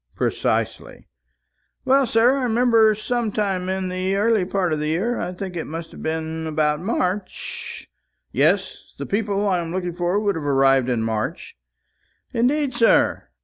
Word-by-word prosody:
"Precisely." - - -2 0.8
"Well, 270 0 +4
sir, 230 +4 +4
I 270 - -1
remember 230 -2 +4
some 230 +1 -2
time 195 -3 -1
in 190 0 -2
the 185 +1 -1
early 210 -1 +2
part 185 -3 0
of 155 - -1
the 150 - -2
year, 195 +10 0
I 175 - -3
think 185 0 -6
it 165 - -4
must 165 +1 -6
have - - -11
been 160 0 -3
about 150 -1 +1
March 210 - -3 0.2
" - - -52
"Yes, - - 0
the - - -5
people 205 -1 -1
I 185 -3 +2
am 165 -1 -4
looking 180 -1 -3
for 175 +3 0
would 205 -1 +1
have 160 - -5
arrived 135 -2 +3
in 120 -3 0
March." 110 -1 -3 0.8
"Indeed, 265 +3 +1
sir! 230 -1 +3
190 Hz, 165 wpm, -22 LUFS, 160-225 Hz, 0.8 s, Well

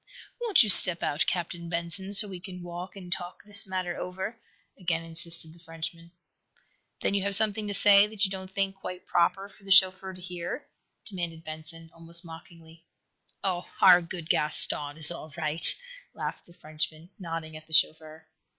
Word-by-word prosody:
"Won't 440 - +3
you 215 - -1
step 180 -3 +8
out, 150 +2 -2
Captain 170 -1 -5
Benson, 170 +3 -4
so 210 +1 +8
we 185 -3 -10
an 180 -1 -11
walk 175 +2 -9
and 180 -3 -6
talk 175 0 -9
this 205 -1 +6
matter 185 -2 -5
over?" 190 +5 -7 0.4
again 165 -2 -3
insisted 165 -1 -7
the 170 - -21
Frenchman. 165 0 -10 0.9
"Then - - 0
you 200 - -1
have 200 +1 +3
something 215 0 +1
to 205 - -5
say 205 0 +4
that 215 -1 -2
you 190 - -5
don't 190 -1 -8
think 195 0 -4
quite 185 -1 -9
proper 195 +3 -1
for 200 - -23
the 195 - -14
chauffeur 190 0 +3
to - - -15
hear?" 180 - -8 0.4
demanded 170 -5 -8
Benson, 160 +1 -8
almost 170 +1 -4
mockingly. 165 0 -15 0.6
"Oh, 180 -2 -4
our 180 -2 +6
good 170 -1 -9
Gaston 150 -1 +3
is 155 0 +11
all 160 -2 -10
right," 155 0 +4 0.4
laughed - - -8
the 170 - -19
Frenchman, 155 +2 -8
nodding 165 -3 -8
at 155 0 -13
the 160 - -12
chauffeur. 155 0 0
175 Hz, 175 wpm, -26 LUFS, 165-190 Hz, 0.9 s, is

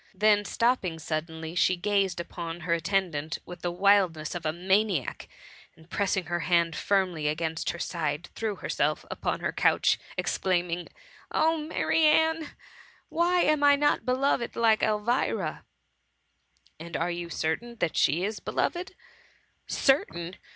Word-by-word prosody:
'' - - -28
Then 205 -1 +5
stopping 230 -9 0
suddenly, 160 +1 -4
she 180 +1 +3
gazed 195 -1 0
upon 170 0 -6
her 170 +1 0
attendant 170 -3 -1
with 180 - -10
the 175 - -1
wildness 180 -4 +2
of 170 -3 -3
a - - +1
maniac, 190 - 0 0.5
and, 160 +2 -20
pressing 195 -2 0
her 175 +2 -2
hand 170 -1 +2
firmly 185 -6 0
against 160 +1 -2
hei 170 - -3
side, 155 -2 -3
threti^ 220 -3 -3
herself - - 0
again - - -22
upon - - -2
her - - -1
couch, - - +2 0.2
exclaiming, 175 -2 0
^^ - - -14 0.4
Oh, 320 +1 +3
Marianne 320 +1 +2
I - - -10 0.6
why 350 +1 +2
am 305 -2 +2
I 285 0 +7
not 290 +1 +2
beloved 255 -1 0
like 225 -2 +3
Elvira?" 215 +4 0 1.1
"And 165 0 -5
are 170 +2 -1
you 170 0 -5
certain 170 +10 -2
that 170 -8 -1
she 165 +6 +2
is 210 +2 -2
be - - -6
loved 365 +2 -1 0.3
?'' - - -31 0.2
" - - -45
Certain 180 - +1
180 Hz, 155 wpm, -27 LUFS, 165-230 Hz, 1.1 s, I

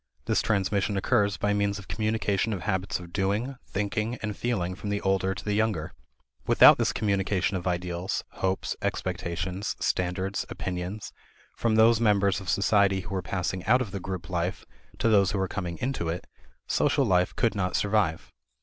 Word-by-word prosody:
This - - +2
transmission 100 -1 0
occurs 100 -2 +2
by 105 +4 +1
means 100 0 0
of 100 - -10
communication 110 +1 0
of 95 - -4
habits 95 -1 -1
of 85 -1 -11
doing, 105 +7 0
thinking, 105 +3 -2
and 105 -2 -2
feeling 95 -7 -1
from 100 +2 -6
the 100 0 0
older 95 0 +1
to 95 - -9
the 105 - 0
younger. 105 -7 0 0.5
Without - - +8
this - - +2
communication 100 -2 0
of 95 0 -3
ideals, 90 0 -2
hopes, 95 0 -2
expectations, 90 +2 -3
standards, 95 +2 -1
opinions, 90 +3 -5 0.4
from 115 -2 +1
those 110 +1 +5
members 100 -3 +3
of 95 - -6
society 100 -1 +3
who 95 +2 -8
are 95 - -1
passing 90 0 -3
out 125 +3 +5
of 120 -6 -3
the 100 - -4
group 95 -1 -5
life 90 0 -2 0.3
to - - +1
those 100 -4 +4
who 100 - 0
are 95 - 0
coming 90 -3 -4
into 125 -10 -1
it, 85 +2 -4 0.4
social - - +2
life 90 -1 +2
could 115 - +2
not 90 -3 -1
survive. 100 -6 0
95 Hz, 175 wpm, -27 LUFS, 90-105 Hz, 0.5 s, Without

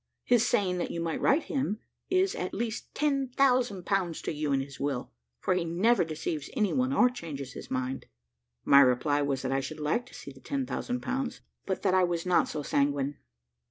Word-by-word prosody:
His 240 -2 +4
saying 180 -3 +1
that - - -2
you 170 - -4
might 165 -1 -2
write 295 +4 +3
to - - -7
him 265 -6 0 0.3
is 375 +1 +2
at 180 - -4
least 225 0 -3
ten 275 -2 +1
thousand 250 -7 +2
pounds 185 -5 0
to - - -2
you 150 -1 -2
in 135 - +3
his 135 0 -7
will, 140 - -2 0.3
for - - +1
he 180 -1 0
never 185 +8 +3
deceives 155 -2 -4
any 210 -6 +1
one, 255 0 +1
or 255 -2 +5
changes 150 - -6
his - - -9
mind." 130 0 -3 0.6
My 140 - +8
reply 140 +2 +4
was 140 -2 -1
that 130 - -1
I 135 - +2
should 135 +3 -6
like 160 +12 0
to - - -14
see 140 - -9
the 135 - -15
ten 275 - -2
thousand 250 0 -3
pounds, 260 -1 -3 0.3
but 190 -1 -2
that 190 - +3
I 185 0 +5
was 175 -1 -1
not 180 -1 +3
so 150 - -4
sanguine. 140 0 0
175 Hz, 215 wpm, -29 LUFS, -, 0.6 s, My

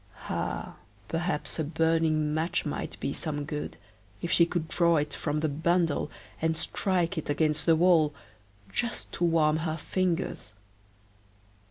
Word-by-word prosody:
Ah! - - -3 0.3
perhaps 165 -2 -2
a - - +2
burning 160 -1 +2
match 160 +3 0
might 145 - -4
be 140 - -2
some 145 -3 -3
good, 150 0 -4 0.4
if 175 - -3
she 170 - +6
could 170 -2 -2
draw 170 +1 +3
it 150 0 -1
from 150 0 -1
the 155 - +2
bundle 165 +1 +1 0.3
and 160 0 +1
strike 180 0 0
it 155 - -8
against 155 +1 +1
the 165 - +7
wall, 165 -3 +5 0.6
just 235 - -2
to - - -3
warm 160 -2 +4
her 160 0 -2
fingers. 175 - -1
160 Hz, 145 wpm, -29 LUFS, 150-170 Hz, 0.6 s, the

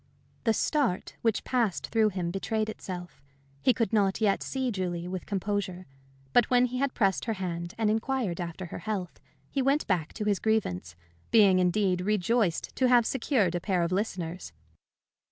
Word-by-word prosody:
The 225 - +4
start 270 - 0
which 225 -2 +1
passed 235 -7 0
through 220 -2 +3
him 180 -3 -3
betrayed 215 +3 -1
itself. 180 -7 -7 0.4
He 255 - +5
could 230 -4 -1
not 200 -3 +2
yet 210 -3 +2
see 260 -2 -2
Julie 175 -3 -3
with 185 0 -5
composure. 195 -2 -2 0.5
But 240 - +5
when 250 0 +5
he 250 0 -3
had 275 -1 0
pressed 195 -5 +1
her 225 - 0
hand 175 -3 -4
and 225 -1 +1
inquired 220 -4 0
after 175 +2 -5
her 170 - -7
health, 200 -5 -4 0.3
he 275 - 0
went 275 +3 +2
back 170 -5 0
to 215 - -4
his 205 -2 +1
grievance, 90 - -1 0.3
being 200 -5 +6
indeed 180 0 +2
rejoiced 210 -1 0
to 260 - +3
have 245 -2 +5
secured 230 - +1
a 175 - 0
pair 185 -3 +1
of 170 - -1
listeners. 180 - -3
200 Hz, 170 wpm, -28 LUFS, 180-225 Hz, 0.5 s, being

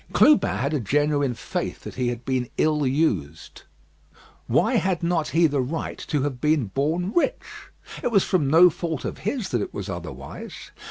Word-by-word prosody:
Clubin 300 -1 +5
had 140 +4 -1
a 150 - +1
genuine 145 +2 +1
faith - - -4
that - - -8
he 125 -1 -1
had 120 0 -4
been 130 -2 -1
ill 150 -3 +2
used. 100 - -1 0.9
Why - - +2
had 185 -3 0
not 170 -2 +1
he 165 +1 +3
the 145 -3 +1
right 150 +6 -4
to 145 -4 0
have 135 -4 -3
been 150 -4 +2
born 160 - -1
rich? 345 - -2 0.3
It - - 0
was 200 -4 +4
from 175 -7 +1
no 170 +4 +7
fault 165 -3 -4
of - - -5
his 220 0 -3
that 120 - 0
it - - -5
was 100 -2 -5
otherwise. 80 -7 -8
145 Hz, 180 wpm, -24 LUFS, 125-170 Hz, 0.9 s, no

